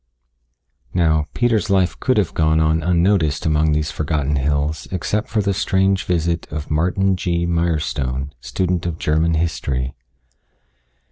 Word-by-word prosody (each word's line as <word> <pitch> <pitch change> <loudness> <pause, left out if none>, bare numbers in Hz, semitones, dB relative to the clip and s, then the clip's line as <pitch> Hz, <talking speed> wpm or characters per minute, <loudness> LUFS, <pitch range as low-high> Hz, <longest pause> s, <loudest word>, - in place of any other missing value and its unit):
Now, 80 -3 +2
Peter's 115 -3 +1
life 95 -2 +1
could 130 -3 +1
have 100 -5 +1
gone 80 0 +2
on 80 +1 +2
unnoticed 85 -2 +1
among 80 0 +2
these 75 +1 0
forgotten 75 -2 -1
hills, 75 +2 -1
except 100 +4 -2
for 105 -1 0
the 100 0 +1
strange 95 -1 +1
visit 85 -1 -1
of 75 0 -5
Martin 90 +5 +1
G. 85 -1 -1
Mirestone, 75 -6 -1
student 90 +2 -1
of 80 -2 -3
German 80 +1 +1
history. 70 -5 -2
80 Hz, 135 wpm, -20 LUFS, 75-90 Hz, -, Now